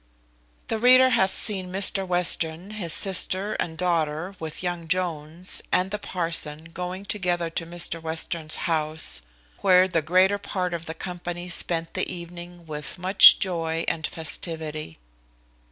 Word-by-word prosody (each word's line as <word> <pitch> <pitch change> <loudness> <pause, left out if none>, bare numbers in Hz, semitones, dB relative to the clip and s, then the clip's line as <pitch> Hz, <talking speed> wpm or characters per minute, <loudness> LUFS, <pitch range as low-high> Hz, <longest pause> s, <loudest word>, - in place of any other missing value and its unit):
The 225 - -2
reader 255 +2 +6
hath 190 -6 +2
seen 190 -4 +5
Mr 195 0 +2
Western, 175 0 +1
his 195 -6 -2
sister, 195 +3 0
and 160 -1 -4
daughter, 170 0 -2
with 160 +2 -7
young 175 -2 -4
Jones, 170 -1 -3
and 185 +1 +1
the 210 - -4
parson, 165 -4 -1
going 180 +2 -6
together 175 -5 -2
to 165 0 -3
Mr 170 -1 -2
Western's 160 0 -2
house, 155 - 0 0.4
where 185 -1 +4
the 170 -3 -1
greater 185 +5 +2
part 185 -3 -4
of 170 -1 -6
the 160 - -6
company 175 0 -7
spent 165 -1 +3
the - - -2
evening 175 0 -10
with 150 +1 -5
much 185 +2 +7
joy 165 -3 -3
and 160 -1 -2
festivity. 160 - -4
175 Hz, 140 wpm, -24 LUFS, 160-185 Hz, 0.4 s, much